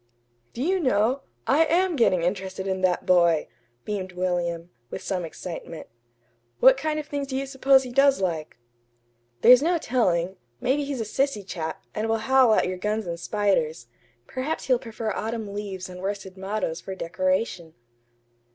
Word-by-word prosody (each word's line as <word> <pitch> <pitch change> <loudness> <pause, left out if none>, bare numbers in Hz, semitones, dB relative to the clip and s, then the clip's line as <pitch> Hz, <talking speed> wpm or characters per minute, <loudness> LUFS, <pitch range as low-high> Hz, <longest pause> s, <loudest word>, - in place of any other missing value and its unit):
"Do 245 - -2
you 375 +4 +1
know? 255 - +2 0.2
I 295 +5 +4
AM 350 +2 +2
getting 185 - +3
interested 190 +1 -2
in 190 -1 -2
that 180 -1 +1
boy," 170 -3 +4 0.4
beamed 190 -3 -4
William, 175 -1 -2 0.2
with - - -6
some 185 -3 -2
excitement. 165 -1 -7 0.7
"What 265 0 +7
kind 305 +3 -2
of 300 - -5
things 285 -1 -4
do 265 -1 -3
you 275 - -2
suppose 270 0 +4
he 250 - -7
does 275 +2 +4
like?" 165 -7 -3 0.8
"There's 250 +2 +8
no 340 +3 +2
telling. 190 - 0 0.2
Maybe 280 +3 +1
he's 275 -4 -3
a - - 0
sissy 220 -1 -1
chap, 160 -4 -5
and 220 +1 -2
will 225 - +2
howl 255 0 +4
at - - +2
your 185 0 -3
guns 210 +3 -2
and 170 -1 -4
spiders. 175 - 0 0.4
Perhaps 265 - -3
he'll 255 -2 +3
prefer 225 -3 -4
autumn 220 -2 -4
leaves 200 -3 -5
and 180 0 -9
worsted 195 -1 -4
mottoes 190 -3 -3
for 190 - -6
decoration." 185 -1 -2
205 Hz, 165 wpm, -25 LUFS, 180-265 Hz, 0.8 s, There's